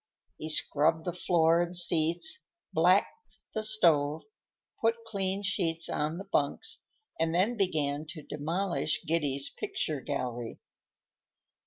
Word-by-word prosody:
He 155 Hz, -, -4 dB
scrubbed 155 Hz, +1 st, +3 dB
the 175 Hz, -, -2 dB
floor 170 Hz, -1 st, +3 dB
and 175 Hz, +1 st, -2 dB
seats, 175 Hz, -, +2 dB, 0.3 s
blacked 455 Hz, -, +2 dB, 0.2 s
the 220 Hz, -, -1 dB
stove, 160 Hz, -9 st, +3 dB, 0.6 s
put 225 Hz, 0 st, +3 dB
clean 195 Hz, -2 st, -2 dB
sheets 165 Hz, -5 st, 0 dB
on 155 Hz, +3 st, -1 dB
the 195 Hz, -, -6 dB
bunks, 195 Hz, -, -1 dB, 0.4 s
and 165 Hz, 0 st, 0 dB
then 200 Hz, +7 st, +2 dB
began 155 Hz, -7 st, -1 dB
to 155 Hz, -2 st, -8 dB
demolish 155 Hz, +1 st, -2 dB
Giddy's 145 Hz, -4 st, 0 dB
picture 150 Hz, -4 st, -3 dB
gallery. 120 Hz, -5 st, -4 dB
165 Hz, 120 wpm, -29 LUFS, 150-190 Hz, 0.6 s, scrubbed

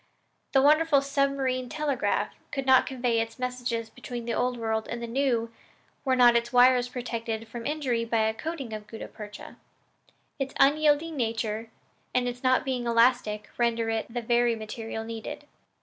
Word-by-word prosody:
The 270 Hz, -1 st, +5 dB
wonderful 300 Hz, -1 st, +5 dB
submarine 275 Hz, -2 st, 0 dB
telegraph 295 Hz, -2 st, -1 dB, 0.2 s
could 270 Hz, -2 st, -3 dB
not 260 Hz, -1 st, +5 dB
convey 245 Hz, -3 st, 0 dB
its 225 Hz, 0 st, -5 dB
messages 245 Hz, -2 st, -3 dB
between 245 Hz, -1 st, -7 dB
the 235 Hz, -, -2 dB
Old 250 Hz, 0 st, 0 dB
World 220 Hz, -1 st, -1 dB
and 235 Hz, -, -4 dB
the 235 Hz, -, -4 dB
New 235 Hz, -2 st, 0 dB, 0.5 s
were 260 Hz, -2 st, +2 dB
not 245 Hz, -1 st, +6 dB
its 235 Hz, 0 st, +1 dB
wires 250 Hz, 0 st, +5 dB
protected 230 Hz, -3 st, -4 dB
from 230 Hz, +1 st, -6 dB
injury 270 Hz, -6 st, -1 dB
by 230 Hz, -1 st, +1 dB
a 220 Hz, 0 st, +1 dB
coating 275 Hz, -3 st, -5 dB
of 210 Hz, -1 st, -7 dB
gutta 225 Hz, -, -8 dB
percha. 210 Hz, -1 st, -10 dB, 0.8 s
Its 270 Hz, 0 st, -3 dB
unyielding 300 Hz, +3 st, +3 dB
nature 225 Hz, -2 st, -2 dB, 0.5 s
and 250 Hz, 0 st, +2 dB
its 245 Hz, 0 st, -5 dB
not 255 Hz, 0 st, +3 dB
being 250 Hz, -3 st, -2 dB
elastic 230 Hz, -3 st, +2 dB
render 230 Hz, -1 st, +1 dB
it 225 Hz, +1 st, -3 dB
the 240 Hz, 0 st, -3 dB
very 240 Hz, 0 st, +2 dB
material 220 Hz, 0 st, -6 dB
needed. 225 Hz, -1 st, -7 dB
240 Hz, 165 wpm, -27 LUFS, 230-265 Hz, 0.8 s, not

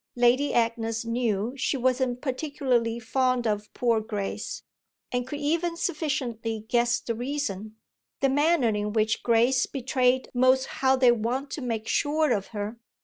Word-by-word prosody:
Lady 245 Hz, +4 st, +3 dB
Agnes 230 Hz, -1 st, 0 dB
knew 230 Hz, -1 st, -1 dB
she 275 Hz, +1 st, -1 dB
wasn't 255 Hz, -1 st, 0 dB
particularly 255 Hz, -4 st, -1 dB
fond 255 Hz, +1 st, 0 dB
of 210 Hz, -1 st, -2 dB
poor 230 Hz, -3 st, +2 dB
Grace, 215 Hz, -, -4 dB, 0.5 s
and 245 Hz, 0 st, -1 dB
could 290 Hz, +2 st, -5 dB
even 335 Hz, +3 st, 0 dB
sufficiently 245 Hz, -10 st, -2 dB
guess 235 Hz, 0 st, +2 dB
the 230 Hz, -, -3 dB
reason 225 Hz, -4 st, -4 dB, 0.4 s
the 275 Hz, -, +3 dB
manner 290 Hz, -1 st, +3 dB
in 210 Hz, -1 st, -2 dB
which 220 Hz, -1 st, +1 dB
Grace 240 Hz, +2 st, +3 dB
betrayed 260 Hz, -1 st, +1 dB
most 255 Hz, +1 st, +4 dB, 0.2 s
how 265 Hz, 0 st, +4 dB
they 255 Hz, -2 st, +5 dB
wanted 240 Hz, +5 st, -2 dB
to 300 Hz, -, -4 dB
make 225 Hz, -3 st, -3 dB
sure 305 Hz, 0 st, +1 dB
of 200 Hz, -4 st, 0 dB
her. 210 Hz, +1 st, -5 dB
245 Hz, 145 wpm, -26 LUFS, 225-265 Hz, 0.5 s, they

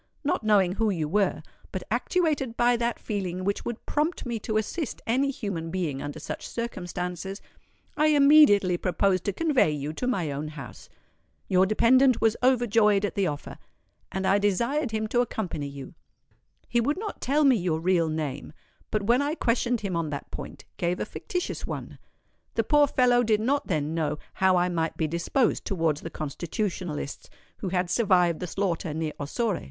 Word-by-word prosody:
Not 285 Hz, -, 0 dB
knowing 200 Hz, -4 st, +4 dB
who 220 Hz, +3 st, 0 dB
you 165 Hz, -6 st, -1 dB
were, 195 Hz, +3 st, +1 dB, 0.3 s
but -, -, -4 dB
actuated 300 Hz, -10 st, 0 dB
by 240 Hz, 0 st, +4 dB
that 235 Hz, 0 st, -1 dB
feeling 185 Hz, -3 st, -3 dB
which 200 Hz, +1 st, -1 dB
would 235 Hz, -1 st, -5 dB
prompt 305 Hz, +2 st, -1 dB
me 235 Hz, -2 st, -3 dB
to 215 Hz, 0 st, -2 dB
assist 265 Hz, -, -3 dB
any 260 Hz, +4 st, +2 dB
human 195 Hz, -11 st, -4 dB
being 165 Hz, -6 st, -2 dB
under 145 Hz, +2 st, -6 dB
such -, -, -6 dB
circumstances, 180 Hz, -3 st, -4 dB, 0.6 s
I 305 Hz, -, +3 dB
immediately 280 Hz, -11 st, +6 dB
proposed 185 Hz, +1 st, +1 dB
to 200 Hz, -, +1 dB
convey 295 Hz, -, +2 dB
you 150 Hz, 0 st, -3 dB
to 250 Hz, -, -3 dB
my 185 Hz, -, 0 dB
own 145 Hz, +2 st, -4 dB
house. 145 Hz, -6 st, -10 dB, 0.6 s
Your 185 Hz, 0 st, +4 dB
dependant 255 Hz, +4 st, +4 dB
was 225 Hz, -1 st, +3 dB
overjoyed 225 Hz, -5 st, +3 dB
at 190 Hz, -, -3 dB
the 195 Hz, -2 st, +1 dB
offer; 145 Hz, -2 st, -6 dB, 0.5 s
and 190 Hz, 0 st, -2 dB
I 195 Hz, +2 st, +4 dB
desired 235 Hz, +8 st, +1 dB
him 220 Hz, 0 st, -2 dB
to 245 Hz, -, +3 dB
accompany 185 Hz, -11 st, -3 dB
you. 140 Hz, -1 st, -9 dB, 0.7 s
He 240 Hz, -, +2 dB
would 290 Hz, +7 st, 0 dB
not 420 Hz, +1 st, -6 dB
tell 290 Hz, +4 st, +2 dB
me 265 Hz, -2 st, +6 dB
your 175 Hz, -4 st, -1 dB
real 170 Hz, -1 st, +2 dB
name, 150 Hz, -2 st, -4 dB, 0.4 s
but 215 Hz, -1 st, -1 dB
when 240 Hz, +6 st, +3 dB
I 290 Hz, +2 st, -1 dB
questioned 240 Hz, -3 st, 0 dB
him 195 Hz, -4 st, -2 dB
on 165 Hz, -2 st, -1 dB
that 145 Hz, -1 st, -6 dB
point, -, -, -8 dB
gave 175 Hz, +1 st, -1 dB
a -, -, -1 dB
fictitious 360 Hz, -4 st, -4 dB
one. -, -, -6 dB, 0.6 s
The -, -, +2 dB
poor 295 Hz, -1 st, +4 dB
fellow 245 Hz, -2 st, +3 dB
did 220 Hz, -3 st, +2 dB
not 280 Hz, +6 st, 0 dB
then 155 Hz, -4 st, -1 dB
know 150 Hz, -2 st, -1 dB, 0.2 s
how 190 Hz, -1 st, +3 dB
I 175 Hz, 0 st, +3 dB
might 165 Hz, -2 st, -2 dB
be 160 Hz, -, +1 dB
disposed 170 Hz, -, 0 dB
towards 165 Hz, -6 st, 0 dB
the 165 Hz, -, -6 dB
Constitutionalists 160 Hz, 0 st, -4 dB, 0.3 s
who 190 Hz, -, -3 dB
had 180 Hz, -1 st, -1 dB
survived 180 Hz, -7 st, +3 dB
the 180 Hz, -, -4 dB
slaughter 170 Hz, -4 st, -2 dB
near 160 Hz, -1 st, -2 dB
Ossore. 195 Hz, -, -1 dB
200 Hz, 180 wpm, -26 LUFS, 170-240 Hz, 0.7 s, immediately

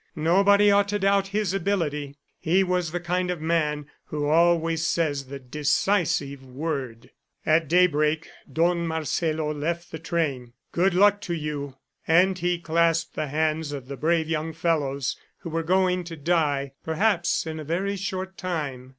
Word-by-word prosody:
Nobody 200 Hz, +6 st, +4 dB
ought 200 Hz, 0 st, +4 dB
to 205 Hz, +1 st, -1 dB
doubt 195 Hz, 0 st, +2 dB
his 200 Hz, -1 st, -1 dB
ability; 155 Hz, -7 st, -1 dB, 0.2 s
he 180 Hz, +4 st, +3 dB
was 180 Hz, -3 st, -1 dB
the 175 Hz, -, -2 dB
kind 180 Hz, +1 st, -1 dB
of 180 Hz, -2 st, -2 dB
man 155 Hz, -2 st, 0 dB, 0.2 s
who 150 Hz, -1 st, -3 dB
always 165 Hz, 0 st, +3 dB
says 150 Hz, -5 st, 0 dB
the 140 Hz, +2 st, -7 dB
decisive 145 Hz, +1 st, 0 dB
word. 130 Hz, -3 st, -5 dB, 0.3 s
At 155 Hz, 0 st, +3 dB
daybreak 160 Hz, -2 st, +2 dB, 0.2 s
Don 170 Hz, +3 st, +1 dB
Marcelo 160 Hz, -1 st, -1 dB
left 170 Hz, +4 st, -3 dB
the 160 Hz, -, -6 dB
train. 145 Hz, -7 st, -2 dB, 0.2 s
"Good 180 Hz, +1 st, +2 dB
luck 205 Hz, +2 st, +5 dB
to 175 Hz, -, -3 dB
you!" 145 Hz, -3 st, -4 dB, 0.3 s
And 180 Hz, +4 st, +4 dB
he 175 Hz, 0 st, 0 dB
clasped 165 Hz, 0 st, +1 dB
the 155 Hz, -, -3 dB
hands 155 Hz, +1 st, -1 dB
of 135 Hz, -3 st, -6 dB
the 140 Hz, -, -5 dB
brave 160 Hz, +2 st, +1 dB
young 160 Hz, 0 st, -2 dB
fellows 145 Hz, -5 st, -1 dB, 0.2 s
who 165 Hz, -, -6 dB
were 165 Hz, +1 st, 0 dB
going 180 Hz, +1 st, +2 dB
to 165 Hz, -1 st, -7 dB
die, 145 Hz, -3 st, 0 dB
perhaps 175 Hz, +2 st, +1 dB
in 160 Hz, -1 st, -5 dB
a -, -, -5 dB
very 185 Hz, +6 st, -1 dB
short 190 Hz, -1 st, -5 dB
time. 145 Hz, -8 st, -4 dB
165 Hz, 160 wpm, -25 LUFS, 150-180 Hz, 0.3 s, luck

